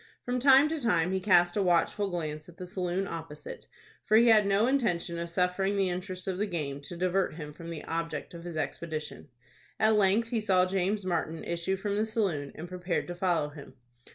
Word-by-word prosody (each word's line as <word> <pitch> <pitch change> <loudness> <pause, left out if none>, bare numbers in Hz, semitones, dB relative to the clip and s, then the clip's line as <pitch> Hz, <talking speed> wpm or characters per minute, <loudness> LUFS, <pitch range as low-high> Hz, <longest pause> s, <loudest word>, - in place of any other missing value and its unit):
From 250 +1 -1
time 270 +2 +7
to 320 -1 -2
time 175 -7 +2
he 190 - 0
cast 175 -2 +4
a 205 - +2
watchful 190 +3 +2
glance 155 -3 -4
at 175 - -15
the 180 - -6
saloon 180 +1 -2
opposite, 160 -3 -8 0.4
for 215 - +4
he 235 +1 +6
had 215 -2 +6
no 200 +3 +3
intention 195 -10 0
of 170 0 -4
suffering 180 +3 0
the 195 -2 +2
interest 185 +1 -5
of 185 -1 -2
the 210 - 0
game 145 -6 -4
to 170 - -7
divert 185 0 0
him 150 -2 -7
from 165 +2 -9
the 165 -2 -6
object 165 -2 -4
of 170 -1 -9
his 170 -2 -6
expedition. 155 +1 -4 0.5
At 220 0 +4
length 210 +3 +3
he 230 -2 0
saw 185 -3 +3
James 190 +2 -1
Martin 165 -2 -2
issue 170 +3 -2
from 200 +1 -2
the 215 - +2
saloon, 185 -11 -1
and 170 - -7
prepared 180 0 -2
to 175 - -4
follow 175 -4 +1
him. 145 -3 -12
180 Hz, 210 wpm, -29 LUFS, 165-200 Hz, 0.5 s, time